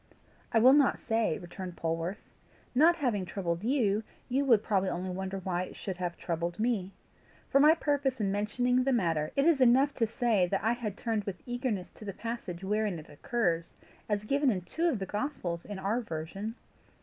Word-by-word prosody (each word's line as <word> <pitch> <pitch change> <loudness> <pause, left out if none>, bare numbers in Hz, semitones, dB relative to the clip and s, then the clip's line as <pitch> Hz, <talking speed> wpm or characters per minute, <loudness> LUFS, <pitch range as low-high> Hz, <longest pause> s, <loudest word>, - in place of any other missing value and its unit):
"I - - +3
will 250 +4 +7
not 285 -2 +4
say," 225 -7 0
returned 180 0 -8
Polwarth. 165 +3 -2 0.6
"Not 320 +7 +6
having 245 - 0
troubled 175 -1 -3
you, 220 -4 +2 0.3
you 265 +3 +2
would 230 -5 +5
probably 195 -3 +1
only 180 +1 -3
wonder 190 +1 -4
why 180 -2 -2
it - - -12
should 190 -3 -5
have 175 -1 -3
troubled 170 0 -3
me. 215 -5 0 0.6
For 275 - +5
my 305 +3 +7
purpose 285 -5 0
in 200 -2 +1
mentioning 245 +5 +1
the 270 +1 +2
matter, 165 -8 +1
it 275 - +3
is 325 -5 +4
enough 260 +3 +5
to 230 - +2
say 220 -5 +2
that 195 +2 -1
I 225 +2 +3
had 215 -5 -4
turned 220 -3 -1
with 195 -3 -6
eagerness 245 -6 -2
to 215 - -12
the 200 - -4
passage 205 -5 -5
wherein 210 -1 0
it 155 - -11
occurs, 170 +1 -1 0.4
as 205 -1 0
given 280 +5 +2
in 195 -6 0
two 330 - 0
of 275 - 0
the 195 - -3
gospels 190 - -3
in 205 -2 -6
our 205 +6 0
version. 195 +4 -5
210 Hz, 195 wpm, -30 LUFS, 180-245 Hz, 0.6 s, will